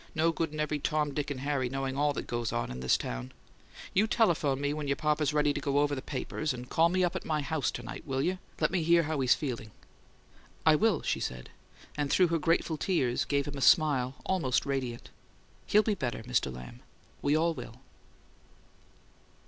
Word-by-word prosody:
"No 165 +1 +3
good 165 -1 -2
in 155 - -6
every 150 0 -1
Tom, 150 0 0
Dick 145 0 -2
and 135 -3 -4
Harry 135 -3 0
knowing 135 0 -3
all 145 +1 +2
what - - -4
goes 120 -1 -2
on 120 - -2
in 65 0 -6
town! 65 0 -1 0.6
You 205 +4 +3
telephone 160 - +2
me 145 +1 0
when 150 -1 -4
your 140 - +1
papa's 150 0 +1
ready 150 -1 +2
to 145 - -4
go 140 0 0
over 145 0 +2
the 135 - -3
papers 150 0 -3
and 125 0 -8
call 165 +1 +4
me 185 +1 +1
up 175 - 0
at - - -3
my 155 -2 -1
house 140 -3 -1
to 120 - -6
night, - - -7
will 135 0 0
you? 185 +3 -1 0.2
Let 155 - +2
me 180 -2 +1
hear 170 +1 +4
how 155 -1 -2
he's 130 -2 +4
feeling?" 125 -6 -4 1.0
"I 160 - +7
will," 205 -2 +2
she - - 0
said, 60 0 -5 0.4
and 145 -1 -1
through 180 +3 +4
her 165 0 +1
grateful 165 0 +1
tears 135 -9 0
gave 140 -1 0
him 145 -1 -5
a - - -6
smile 135 -2 +4
almost 165 -10 +1
radiant. 130 -4 -3 0.6
"He'll 210 +1 +5
be 215 - +1
better, 125 - -3
Mr. 120 - 0
Lamb. 60 0 -10 0.4
We 145 +1 +2
all 165 +1 +2
will." - - -8
145 Hz, 205 wpm, -30 LUFS, 130-160 Hz, 1.0 s, I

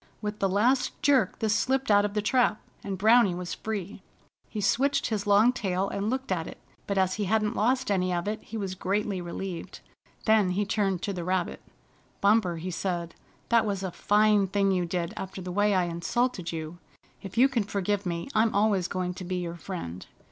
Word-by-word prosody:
With 210 0 -4
the 195 - +1
last 235 +7 +1
jerk 280 -2 +3
this 220 -2 +1
slipped 265 -1 +1
out 205 0 +5
of 205 0 -4
the 210 - 0
trap, 240 -2 +2 0.2
and 195 -1 -4
Browny 220 -1 +5
was 180 0 -5
free. 205 -3 -5 0.5
He 215 - -5
switched 265 +8 +2
his 210 -2 -2
long 210 +5 +5
tail, 195 -5 -1
and 200 +2 -2
looked 260 -2 -3
at 165 -3 -1
it, - - -9 0.3
but 200 - -1
as 190 -1 +2
he 210 0 -2
hadn't 215 +1 +1
lost 255 +1 +1
any 185 -2 +1
of 175 +1 -1
it 215 +1 -2
he 225 - -7
was 195 -3 -3
greatly 195 0 -1
relieved. 175 0 -6 0.5
Then 215 -4 +4
he 205 - +1
turned 195 -3 0
to 200 - -1
the 175 -2 -4
rabbit. 185 0 -1 0.6
"Bumper," 200 -4 +3
he 180 +3 -5
said, 170 -1 -3 0.4
"that 235 -1 +4
was 200 -3 -2
a 190 - -3
fine 205 +2 +3
thing 195 +1 +1
to 180 -2 0 0.2
do - - -11
after 190 0 -6
the 180 -1 -5
way 205 +2 +2
I 185 - +3
insulted 175 +4 -1
you. 160 +1 -6 0.4
If 195 +2 -9
you 255 +3 +7
can 265 -4 0
forgive 205 -1 -1
me 170 -2 -3
I'm 220 0 +2
always 200 -3 +2
going 180 -1 -2
to 185 - -8
be 185 +1 -3
your 175 -1 -3
friend. 165 - -6
200 Hz, 205 wpm, -27 LUFS, 180-215 Hz, 0.6 s, you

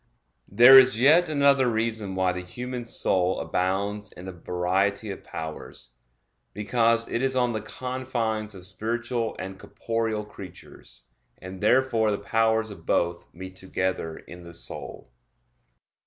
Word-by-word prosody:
There 130 +3 +9
is 130 -3 +3
yet 155 +6 +5
another 140 -3 +3
reason 110 -3 -2
why 95 -1 +1
the 90 - -4
human 125 +6 -6
soul 95 -4 +1
abounds 100 +3 -2
in 90 - -11
a - - -5
variety 95 +4 -1
of 95 - -9
powers 80 -5 -8 0.6
because 115 +2 +1
it 115 - -2
is 135 0 0
on 125 -2 +1
the 110 - -3
confines 120 -5 -3
of 90 -2 -7
spiritual 115 +4 -2
and 95 0 -7
corporeal 110 +1 -3
creatures; 90 -11 -12 0.3
and 95 0 -10
therefore 115 0 +3
the 100 - 0
powers 110 +1 +1
of 85 -5 -11
both 85 +1 -1
meet 95 +2 -10
together 95 -3 -3
in 90 0 -12
the 85 0 -11
soul. 85 - -7
105 Hz, 140 wpm, -25 LUFS, 95-120 Hz, 0.6 s, There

